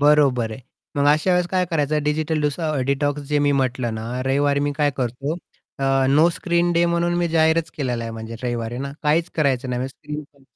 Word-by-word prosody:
बरोबर 140 -6 +4
आहे. 110 - -8 0.4
मग 140 - +2
अशा 155 +5 +1
वेळेस 180 0 +2
काय 185 0 +1
करायचं 150 -2 +1
डिजिटल 155 +1 0
डीसो 155 +2 -1
डिटॉक्स 145 +1 0
जे 150 -1 +2
मी 145 0 +3
म्हटलं 130 -4 0
ना 110 0 -5 0.2
रविवारी 140 +1 +2
मी 145 0 0
काय 145 -1 +3
करतो 135 +5 -2 0.4
अ, 135 - -1 0.2
नो 150 +5 +5
स्क्रीन 175 0 0
डे 170 0 +3
म्हणून 170 0 +1
मी 175 -1 +1
जाहीरच 160 0 +2
केलेला 125 -5 -2
आहे 115 - -4
म्हणजे 115 0 -7
रविवारी 120 -1 -3
ना. 140 +1 -4
काहीच 160 +2 +2
करायचं 135 -4 +1
नाही 125 - -1
म्हणजे 130 - -2
स्क्रीन 150 +2 -7
पण 140 -1 -25
145 Hz, 205 wpm, -22 LUFS, 130-160 Hz, 0.4 s, नो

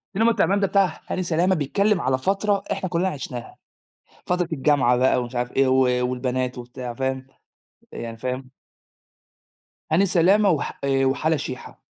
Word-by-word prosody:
السلم 225 +3 +3
والتعبان 200 -4 +2
ده 200 - +2
بتاع 195 -4 +1
هاني 185 - -2
سلامة، 175 +2 +1
بيتكلّم 200 +6 +1
على 130 0 +1
فترة 195 +7 0
إحنا 185 - -2
كلّنا 175 +2 0
عِشناها، 130 -7 -7 0.7
فترة 180 -1 0
الجامعة 135 -4 +3
بقى 130 0 +3
ومش 120 +1 -7
عارف 120 0 -2
إيه 135 0 +2
و 130 0 +3 0.3
والبنات 125 0 -2
وبتاع 125 0 -7
فاهم، 130 +1 -3 0.6
يعني 115 -1 -7
فاهم؟ 130 +2 -4 1.4
هاني 180 +5 +4
سلامة، 195 +3 +4
وح 155 -5 -1
آآ 135 -1 +2
وحلا 155 +4 +1
شيحة. 130 -3 -7
140 Hz, 150 wpm, -23 LUFS, 130-185 Hz, 1.4 s, هاني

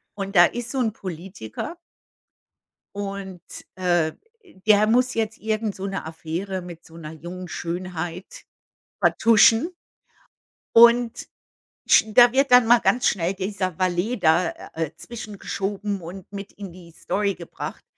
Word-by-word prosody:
Und 195 0 -5
da 175 0 +9
ist 240 +6 -4
so'n 245 -4 +1
Politiker 185 - -7 1.2
Und, 195 -3 -6 0.3
äh, 175 -4 +1 0.5
der 215 0 +5
muss 250 +3 +2
jetzt 220 -1 -2
irgend 215 -1 -2
so 190 - -6
'ne 195 -4 -4
Affäre 170 +4 -5
mit 175 -2 -11
so 165 - -16
'ner 155 -1 -8
jungen 175 +3 -8
Schönheit 175 0 -6 0.6
vertuschen. 230 - +4 1.0
Und 235 0 +5 0.6
sch - - +6
da 240 +2 +6
wird 270 +1 +2
dann 250 -1 +7
mal 240 +1 +6
ganz 245 - +2
schnell 180 0 0
dieser 190 -3 -3
Valet 185 +6 0
da, 165 +2 +4 0.2
äh, 160 -2 -3
zwischengeschoben 205 -3 -5
und 180 +4 -10
mit 200 0 -7
in 200 -3 -9
die 170 -1 -14
Story 200 +4 -1
gebracht, 170 -1 -8
195 Hz, 130 wpm, -23 LUFS, 175-220 Hz, 1.2 s, da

